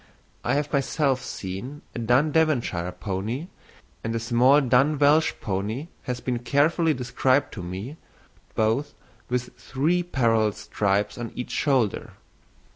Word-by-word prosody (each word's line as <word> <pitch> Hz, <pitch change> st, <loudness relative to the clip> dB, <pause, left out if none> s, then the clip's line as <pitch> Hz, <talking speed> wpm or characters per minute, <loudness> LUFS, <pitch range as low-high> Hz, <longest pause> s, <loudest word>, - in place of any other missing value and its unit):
I -, -, +1 dB
have 145 Hz, +1 st, -1 dB
myself 140 Hz, -1 st, +1 dB
seen 100 Hz, +10 st, -6 dB
a -, -, -5 dB
dun 125 Hz, +6 st, +3 dB
Devonshire 125 Hz, -, +1 dB
pony, 100 Hz, -, -4 dB, 0.5 s
and 115 Hz, 0 st, -2 dB
a -, -, 0 dB
small 120 Hz, +5 st, +4 dB
dun 135 Hz, +3 st, +3 dB
Welsh 150 Hz, +3 st, +4 dB
pony 105 Hz, -, -3 dB, 0.2 s
has 125 Hz, -1 st, -3 dB
been 125 Hz, -1 st, -2 dB
carefully 150 Hz, +6 st, +2 dB
described 130 Hz, +2 st, +1 dB
to 100 Hz, -, -6 dB
me, 95 Hz, -, -6 dB, 0.6 s
both 115 Hz, +7 st, 0 dB, 0.3 s
with 125 Hz, 0 st, -2 dB
three 160 Hz, +7 st, 0 dB
parallel 115 Hz, -, +2 dB
stripes 100 Hz, +2 st, -1 dB
on 115 Hz, -2 st, -5 dB
each 125 Hz, -, -5 dB
shoulder. 130 Hz, -8 st, 0 dB
125 Hz, 130 wpm, -25 LUFS, 110-145 Hz, 0.6 s, small